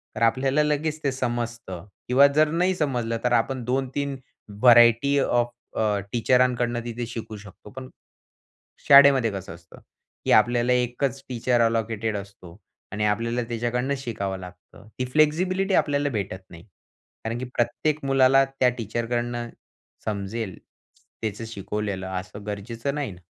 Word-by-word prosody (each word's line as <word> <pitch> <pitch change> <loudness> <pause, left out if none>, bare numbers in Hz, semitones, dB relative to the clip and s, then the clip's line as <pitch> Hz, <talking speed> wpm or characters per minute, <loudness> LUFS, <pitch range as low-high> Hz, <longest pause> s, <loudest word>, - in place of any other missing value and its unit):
तर 110 - -6
आपल्याला 130 +6 +2
लगेच 150 +1 -1
ते 140 - +1
समजतं. 120 -7 -4 0.2
किंवा 130 +3 +6
जर 155 +1 +5
नाही 180 +3 +2
समजलं, 125 -8 -1
तर 125 - +1
आपण 120 +2 0
2-3 135 +2 -2 0.5
व्हरायटी 120 +3 +6
ऑफ 120 -2 +1 0.3
अ, 105 -2 +1
टीचरांकडून 125 0 +2
तिथे 120 0 -4
शिकू 115 -2 -7
शकतो. 100 0 -14
पण 130 0 -9 1.0
शाळेमध्ये 140 -4 +7
कसं 95 -3 -7
असतं, 85 -1 -17 0.5
की - - +1
आपल्याला 120 +2 +4
एकच 125 +2 -1
टीचर 120 0 +1
अलोकेटेड 115 -1 0
असतो. 100 -4 -11 0.4
आणि 105 0 -1
आपल्याला 115 +4 0
त्याच्याकडून 120 +4 -1
शिकावं 105 -7 -4
लागतं. 90 +3 -13
ती 125 - 0
फ्लेक्सिबिलिटी 185 +6 +2
आपल्याला 145 -1 +1
भेटत 100 -6 -4
नाही. 85 -1 -13 0.6
कारण 115 +1 -3
की 130 - -4
प्रत्येक 145 +6 0
मुलाला 135 0 +5
त्या 135 -1 +1
टीचरकडनं 120 +1 -3 0.6
समजेल 100 -1 -4 0.6
त्याचं 110 +1 -4
शिकवलेलं 100 -2 -4
असं 100 +2 -10
गरजेचं 115 +6 -4
नाही 145 -6 -3
ना? 90 0 -14
120 Hz, 135 wpm, -24 LUFS, 110-135 Hz, 1.0 s, शाळेमध्ये